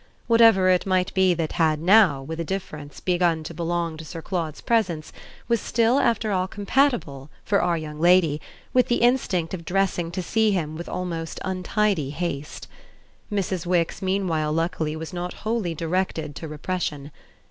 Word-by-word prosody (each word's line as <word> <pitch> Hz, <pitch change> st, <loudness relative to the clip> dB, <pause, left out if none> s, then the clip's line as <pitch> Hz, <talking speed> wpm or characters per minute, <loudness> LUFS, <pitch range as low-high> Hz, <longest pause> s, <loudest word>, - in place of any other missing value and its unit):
Whatever 225 Hz, -5 st, +5 dB
it 185 Hz, +1 st, +3 dB
might 185 Hz, -1 st, +1 dB
be 190 Hz, -2 st, +3 dB
that 160 Hz, -2 st, -2 dB
had 155 Hz, -2 st, +2 dB
now, 175 Hz, -5 st, +5 dB
with 160 Hz, +4 st, -6 dB
a -, -, 0 dB
difference, 155 Hz, -5 st, -6 dB
begun 175 Hz, -3 st, +1 dB
to 160 Hz, -, -7 dB
belong 170 Hz, -1 st, -2 dB
to 160 Hz, -, -8 dB
Sir 165 Hz, +2 st, -7 dB
Claude's 165 Hz, -5 st, -3 dB
presence 185 Hz, -10 st, 0 dB, 0.3 s
was 235 Hz, -2 st, +1 dB
still 235 Hz, +3 st, +2 dB
after 225 Hz, -4 st, +1 dB
all 185 Hz, -1 st, 0 dB
compatible, 200 Hz, -, 0 dB, 0.2 s
for 200 Hz, -1 st, +2 dB
our 175 Hz, -1 st, +1 dB
young 155 Hz, -1 st, -7 dB
lady, 170 Hz, -3 st, +4 dB, 0.3 s
with 250 Hz, -1 st, +4 dB
the 240 Hz, -, +2 dB
instinct 235 Hz, -10 st, +1 dB
of 175 Hz, -3 st, -5 dB
dressing 180 Hz, -1 st, 0 dB
to 180 Hz, +2 st, -4 dB
see 220 Hz, +4 st, +2 dB
him 160 Hz, -6 st, -1 dB
with 170 Hz, +2 st, -7 dB
almost 165 Hz, -3 st, -4 dB
untidy 190 Hz, -4 st, 0 dB
haste. 150 Hz, -2 st, -5 dB, 0.6 s
Mrs. 190 Hz, -4 st, -2 dB
Wix 175 Hz, -2 st, 0 dB
meanwhile 185 Hz, -5 st, 0 dB
luckily 160 Hz, -1 st, -1 dB
was 160 Hz, 0 st, -7 dB
not 180 Hz, 0 st, -4 dB
wholly 215 Hz, -7 st, -1 dB
directed 165 Hz, -2 st, -2 dB
to 160 Hz, -, -6 dB
repression. 150 Hz, -2 st, -4 dB
175 Hz, 165 wpm, -24 LUFS, 160-195 Hz, 0.6 s, Whatever